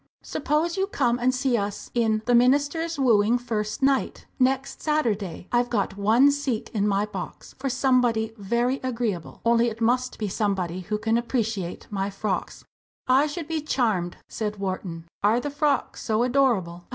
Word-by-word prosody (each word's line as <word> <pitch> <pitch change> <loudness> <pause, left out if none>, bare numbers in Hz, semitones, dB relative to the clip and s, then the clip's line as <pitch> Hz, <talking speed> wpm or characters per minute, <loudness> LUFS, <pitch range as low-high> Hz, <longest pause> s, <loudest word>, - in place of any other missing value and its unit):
"Suppose 310 +5 -1
you 385 +1 +1
come 245 - +1
and 250 +1 +3
see 255 -1 0
us 205 -2 -3
in 220 -2 +1
'The 245 - +2
Minister's 290 +7 +3
Wooing,' 235 -3 +4
first 220 -1 -3
night 270 0 +1
next 265 +1 +1
Saturday. 220 - -1
I've 245 0 +2
got 200 -4 -1
one 225 +8 +4
seat 280 -6 -2
in 210 -2 +1
my 200 0 +1
box, 195 -4 -8
for 270 0 -1
somebody 245 -4 +2
very 235 +5 0
agreeable. 230 -9 -3
Only 235 0 +4
it 225 0 -8
must 250 +2 +1
be 215 - -2
somebody 190 -3 -1
who 210 +4 -3
can 225 +2 +1
appreciate 225 -7 -2
my 195 -1 -1
frocks!" 195 -1 -3 0.4
"I 265 +4 +4
should 305 +1 -5
be 320 -2 -2
charmed," 220 - 0
said 210 -1 -3
Wharton. 185 -4 -4 0.2
"Are 215 +4 +3
the 290 +3 -4
frocks 285 -2 0
so 220 +1 +1
adorable?" 230 -10 +1
235 Hz, 165 wpm, -25 LUFS, 205-265 Hz, 0.4 s, Wooing